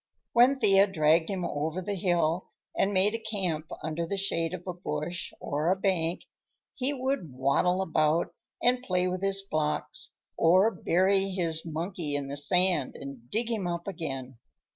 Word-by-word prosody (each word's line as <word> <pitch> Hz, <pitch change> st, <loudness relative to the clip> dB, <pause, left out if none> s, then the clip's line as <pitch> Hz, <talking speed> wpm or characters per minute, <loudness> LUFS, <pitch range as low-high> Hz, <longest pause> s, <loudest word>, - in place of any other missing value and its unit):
When 250 Hz, +4 st, +5 dB
Thea 195 Hz, -5 st, +5 dB
dragged 160 Hz, -2 st, +3 dB
him 190 Hz, -3 st, -2 dB
over 155 Hz, +4 st, -2 dB
the 200 Hz, +2 st, -3 dB
hill 175 Hz, -2 st, 0 dB, 0.3 s
and 195 Hz, -, +2 dB
made 200 Hz, +2 st, +4 dB
a 230 Hz, -, -2 dB
camp 190 Hz, -8 st, -2 dB, 0.2 s
under 160 Hz, +2 st, -2 dB
the 200 Hz, -, -2 dB
shade 165 Hz, -4 st, 0 dB
of 180 Hz, -1 st, -6 dB
a 180 Hz, -, -3 dB
bush 170 Hz, 0 st, -4 dB
or 150 Hz, +4 st, -1 dB
a 185 Hz, -, +4 dB
bank, 180 Hz, -3 st, 0 dB, 0.5 s
he 265 Hz, +2 st, +1 dB
would 260 Hz, -, -2 dB
waddle 160 Hz, +8 st, +2 dB
about 160 Hz, 0 st, +1 dB, 0.3 s
and 250 Hz, +1 st, +3 dB
play 180 Hz, -6 st, 0 dB
with 185 Hz, 0 st, -3 dB
his 195 Hz, 0 st, 0 dB
blocks, 155 Hz, -5 st, -2 dB, 0.2 s
or 185 Hz, +6 st, +4 dB
bury 190 Hz, +3 st, +2 dB
his 170 Hz, -4 st, 0 dB
monkey 165 Hz, -1 st, -3 dB
in 140 Hz, -1 st, -3 dB
the 140 Hz, -, -4 dB
sand 175 Hz, 0 st, +2 dB
and 135 Hz, -4 st, -9 dB
dig 230 Hz, +2 st, -1 dB
him 210 Hz, -6 st, -1 dB
up 170 Hz, +1 st, -4 dB
again. 135 Hz, -9 st, -5 dB
180 Hz, 165 wpm, -28 LUFS, 155-195 Hz, 0.5 s, When